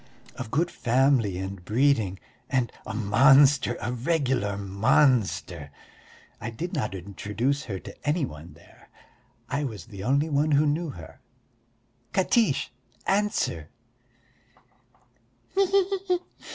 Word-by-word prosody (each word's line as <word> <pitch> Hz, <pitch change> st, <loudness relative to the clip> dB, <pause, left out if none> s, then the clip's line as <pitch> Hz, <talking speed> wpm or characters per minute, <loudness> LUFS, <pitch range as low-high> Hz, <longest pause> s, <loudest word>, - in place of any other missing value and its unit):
Of 125 Hz, -3 st, -6 dB
good 165 Hz, +8 st, 0 dB
family 125 Hz, -5 st, +2 dB
and 95 Hz, -1 st, -6 dB
breeding 110 Hz, -3 st, +1 dB, 0.3 s
and 125 Hz, -5 st, 0 dB, 0.2 s
a -, -, -4 dB
monster, 130 Hz, +4 st, +5 dB
a 120 Hz, +4 st, -3 dB
regular 125 Hz, -7 st, 0 dB
monster! 95 Hz, -, +1 dB, 0.7 s
I -, -, -4 dB
did 170 Hz, +11 st, -5 dB
not 115 Hz, -, -2 dB
introduce 105 Hz, -, -2 dB
her 100 Hz, -4 st, -4 dB
to -, -, -10 dB
any 150 Hz, +1 st, +1 dB
one 80 Hz, -, -11 dB
there, -, -, -20 dB, 0.6 s
I 140 Hz, +3 st, -2 dB
was 115 Hz, -7 st, -5 dB
the 100 Hz, -5 st, -9 dB
only 140 Hz, +6 st, +2 dB
one 150 Hz, 0 st, +1 dB
who 145 Hz, +2 st, +4 dB
knew 155 Hz, +3 st, 0 dB
her.... 80 Hz, -, -11 dB, 0.9 s
Katiche, 195 Hz, -, +2 dB, 0.3 s
answer!" 195 Hz, -, 0 dB
125 Hz, 110 wpm, -26 LUFS, 100-145 Hz, 0.9 s, monster